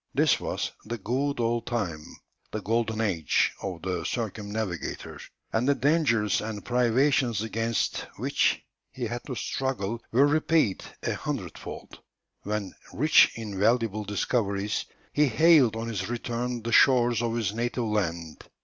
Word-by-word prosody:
This - - +4
was - - -3
'the 120 - -4
good 130 +7 -1
old 115 0 0
time,' 90 -11 -3 0.3
the 110 - -4
golden 110 0 0
age 90 -8 +1
of 90 -4 -5
the 90 -3 -2
circumnavigator, 105 - -4 0.3
and 120 +5 +2
the 140 - +4
dangers 130 - +2
and 105 -2 -5
privations 125 -2 +2
against 115 0 -1
which - - +1 0.3
he 130 - -6
had 120 +2 -4
to 130 - -4
struggle 120 -4 -2
were 130 +5 +5
repaid 155 - +2 0.2
a - - 0
hundredfold, - - -6 0.4
when, 105 -2 -3 0.2
rich 150 +5 +5
in 105 -4 -5
valuable 110 -1 +2
discoveries, 105 -1 -1 0.3
he 150 0 +4
hailed 140 -3 +5
on 115 +1 -4
his 100 -4 -3
return 120 0 -3
the 115 - -3
shores 120 -4 +5
of 115 -1 -1
his 110 -4 -1
native 120 +2 -1
land. 85 -7 -2
115 Hz, 140 wpm, -27 LUFS, 105-125 Hz, 0.4 s, were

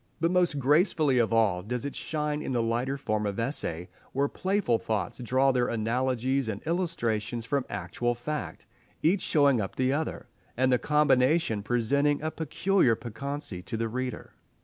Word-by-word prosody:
But 165 +1 +1
most 180 -4 +2
gracefully 145 -1 +3
of 115 -1 +2
all 110 -6 +3
does 125 +7 -4
it 140 - -4
shine 150 -1 -2
in 130 - -3
the 120 - +1
lighter 120 +4 -1
form 110 -5 -1
of 100 +2 -3
essay, 90 - -2 0.3
where 140 +2 +1
playful 185 - 0
thoughts 110 +2 -3
draw 130 +3 +2
their 125 -1 +1
analogies 125 +3 0
and 100 -2 -3
illustrations 120 - -1
from 140 +2 -1
actual 120 0 -2
fact, 150 +5 -5 0.4
each 180 +4 +3
showing 140 -6 +3
up 95 - -5
the 130 +1 +1
other, 155 +2 -3 0.3
and 130 +1 +3
the 125 - +3
combination 150 -4 +3
presenting 140 +6 +1
a 155 - -1
peculiar 160 -3 +2
piquancy 120 -2 -5
to 115 +5 -5
the 115 0 -1
reader. 125 +2 -4
130 Hz, 165 wpm, -28 LUFS, 115-150 Hz, 0.4 s, gracefully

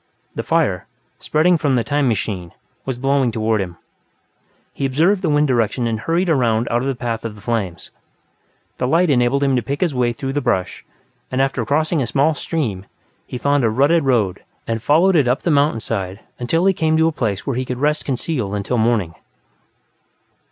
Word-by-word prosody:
The - - -3
fire, - - 0 0.3
spreading 165 +2 +2
from 140 -3 +1
the 120 - +1
"time 145 0 0
machine", 100 -6 -2 0.3
was 130 -2 -3
blowing 135 -1 +1
toward 110 -1 0
him; 90 -2 -6 1.0
he - - -5
observed 165 +9 +2
the 175 - 0
wind 150 0 +3
direction 120 -1 +1
and 115 -1 -1
hurried 170 +9 0
around 120 -7 +2
out 120 +1 +1
of 135 - -2
the 135 - -1
path 115 -2 -3
of 115 -2 -5
the 105 - -14
flames. 105 -6 -3 0.9
The 125 - 0
light 165 +4 +3
enabled 130 +2 +2
him 135 -1 +2
to 125 - +1
pick 140 +6 -4
his 175 -5 +1
way 125 -2 +1
through 135 +3 -4
the 145 - 0
brush, 95 -8 -1 0.5
and, 130 - -2
after 135 -2 +1
crossing 155 +2 +1
a 120 - -1
small 145 +3 +2
stream, 120 - -3 0.4
he - - -5
found 140 +1 +1
a 115 - +3
rutted 140 +8 +3
road 115 -9 +1 0.2
and 115 -1 -2
followed 165 +9 +3
it 145 -6 +4
up 125 +4 0
the 170 - +1
mountainside 115 -9 0 0.2
until 165 +9 0
he 195 - +4
came 160 -3 +1
to 160 0 +4
a - - +1
place 110 -9 -2
where 135 - -2
he 130 - -1
could 125 -1 -4
rest 150 +3 0
concealed 125 -6 -2
until 105 +4 -1
morning. 110 -7 +1
130 Hz, 195 wpm, -19 LUFS, 115-150 Hz, 1.0 s, it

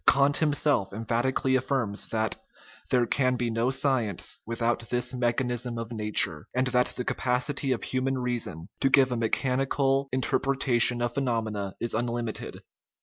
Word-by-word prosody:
Kant 140 +1 +5
himself 145 -9 +1
emphatically 120 +4 0
affirms 125 -5 0
that 110 -1 0 0.3
" - - -22
there 125 -2 +3
can 130 +2 +1
be 120 -1 -1
no 115 +2 +1
science 130 -8 0
without 115 0 -1
this 125 +1 0
me 120 -1 +1
chanicism 120 -1 -2
of 115 0 -6
nature," 105 -8 0
and 130 +1 +2
that 125 0 +1
the 125 - -3
capacity 130 +2 0
of 125 - -1
human 130 +1 -1
reason 120 -10 -3
to 135 - +3
give 135 -1 +5
a - - 0
mechanical 135 +3 +1
interpretation 130 -2 +2
of 120 0 -1
phenom 120 -5 0
ena 100 -2 -4
is 115 - -3
unlimited. 120 -1 -3
125 Hz, 155 wpm, -27 LUFS, 115-130 Hz, 0.3 s, Kant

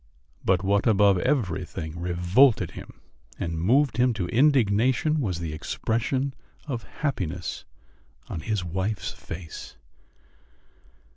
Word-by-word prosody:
But 95 0 +2
what 100 +3 +2
above 100 -3 +5
everything 90 - -2
revolted 90 +8 +3
him - - -11 0.4
and 85 -1 -2
moved 125 - +3
him 125 -1 +3
to 90 -5 -2
indignation 130 +3 +3
was 95 -9 -1
the 80 -3 -4
expression 125 - -1 0.3
of 130 -7 -3 0.2
happiness 95 - -3 0.6
on - - -4
his 105 +2 -2
wife's 95 +4 -2
face. 80 -1 -9
100 Hz, 110 wpm, -26 LUFS, 90-125 Hz, 0.6 s, above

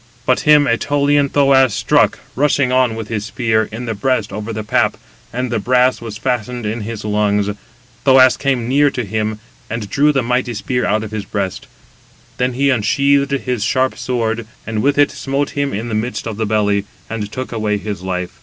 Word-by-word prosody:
But - - +3
him 150 -1 +5
192 120 -1 0
Ætolian 145 0 +2
Thoas 135 -4 +4
struck, - - +2 0.2
rushing 140 -1 +2
on 130 -3 +2
with 110 -1 -5
his 105 -2 -3
spear, 110 -2 0
in 115 +3 -6
the 115 - -2
breast 110 -1 -1
over 105 +2 -5
the 110 -1 -4
pap, - - +1 0.3
and 125 0 -3
the 115 - 0
brass 125 +4 +2
was 110 -3 -6
fastened 125 -1 -2
in 110 +2 -2
his 110 0 -6
lungs: 105 -1 +1 0.5
Thoas 130 -2 +6
came 130 -4 -1
near 145 +3 +4
to 125 -4 -4
him, 110 +1 -2 0.3
and 115 -2 -4
drew 150 +2 +4
the 135 -3 0
mighty 125 0 -1
spear 125 +4 -1
out 110 +1 +1
of 110 - -7
his 110 -2 -4
breast; 95 -2 -4 0.7
then 125 0 0
he 140 +2 +2
unsheathed 140 +4 +2
his 125 -5 -1
sharp 130 +3 +1
sword, 115 -3 -2 0.2
and 110 -1 -2
with 140 +3 +1
it 145 0 +4
smote 140 +1 -2
him 140 -1 -1
in 110 +4 -3
the 115 - -4
midst 110 +4 -2
of 110 -2 -4
the 110 -1 -1
belly, 105 -2 +1 0.2
and 105 -2 -5
took 130 0 -5
away 110 -2 -1
his 100 -2 -5
life. 90 -1 -4
115 Hz, 200 wpm, -17 LUFS, 105-130 Hz, 0.7 s, Thoas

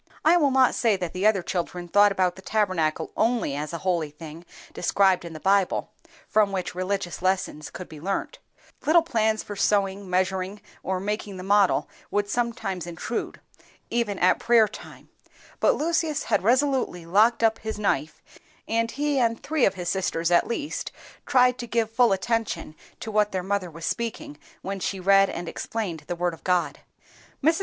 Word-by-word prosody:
I 325 +3 +6
will 300 -5 +4
not 260 -1 +4
say 225 -4 +2
that 180 -3 -4
the 190 +3 +2
other 200 -4 +2
children 175 0 -3
thought 205 +3 +5
about 185 -2 +1
the 190 - -12
Tabernacle 185 -7 0
only 225 - +1
as 150 +1 -4
a 170 - -3
holy 170 -5 +1
thing 155 +2 -11 0.3
described 190 0 +2
in 170 -1 -8
the 155 - -8
Bible, 195 +2 +1 0.4
from 210 -2 +3
which 185 -2 -3
religious 185 -3 -3
lessons 185 -5 -1
could 180 +1 -8
be 155 -2 -11
learnt,—little 295 - -1
plans 220 -8 0
for 205 - -7
sewing, 195 -1 0
measuring, 185 +2 -1 0.2
or 190 -1 -2
making 205 0 -4
the 185 - -7
model 200 0 +3 0.2
would 205 0 0
sometimes 220 -6 -2
intrude, 175 +7 -5 0.5
even 230 -4 0
at 180 - +3
prayer 235 -2 +4
time; 210 - -12 0.5
but - - +4
Lucius 325 -3 0
had - - +1
resolutely 250 -5 +1
locked 215 +7 +3
up 225 0 +3
his 220 -1 -5
knife, 160 -7 -1 0.4
and 230 0 0
he 290 +2 0
and 230 -2 0
three 310 -3 +2
of 195 - +1
his 180 -1 -5
sisters 175 -3 -1
at 175 - +4
least 290 +5 -4 0.4
tried 250 -2 +4
to 240 - -5
give 225 -1 0
full 240 0 +4
attention 215 -4 -1 0.2
to 220 - -6
what 210 0 +2
their 185 -1 -2
mother 195 -1 -1
was 165 0 -8
speaking 260 +8 -4 0.2
when 195 +1 -4
she 190 +1 -3
read 195 +1 +5
and 175 - -5
explained 190 -8 -4
the 175 - -3
Word 175 0 -1
of 165 - -13
God. 180 -1 0 0.6
Mrs. 320 +4 +3
200 Hz, 175 wpm, -25 LUFS, 180-230 Hz, 0.6 s, I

